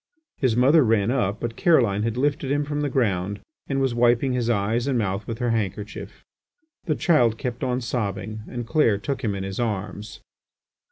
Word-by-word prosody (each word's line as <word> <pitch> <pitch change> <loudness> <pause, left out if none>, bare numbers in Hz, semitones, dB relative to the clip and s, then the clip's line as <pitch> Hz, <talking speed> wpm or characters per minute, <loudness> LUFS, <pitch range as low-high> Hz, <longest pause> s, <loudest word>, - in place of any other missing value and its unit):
His 130 -5 +2
mother 140 +6 +5
ran 110 -1 +2
up, 105 -6 0
but 115 -1 -4
Caroline 115 - +3
had 115 +2 -2
lifted 145 0 0
him 145 +1 +1
from 145 0 -2
the 145 - 0
ground 100 -6 0 0.3
and 135 -1 -1
was 135 -2 +1
wiping 120 +2 +3
his 120 -2 0
eyes 115 +3 0
and 135 -3 +1
mouth 100 -1 -2
with 115 - -4
her 120 -1 0
handkerchief. 105 -1 -4 0.6
The 155 -5 0
child 120 -9 +3
kept 125 +1 -4
on 125 0 0
sobbing 110 -3 -3
and 120 -1 -5
Clair 115 -6 +2
took 135 +6 -4
him 105 -4 0
in 95 - -4
his 95 +2 -5
arms. 105 -2 -4
120 Hz, 185 wpm, -24 LUFS, 105-130 Hz, 0.6 s, mother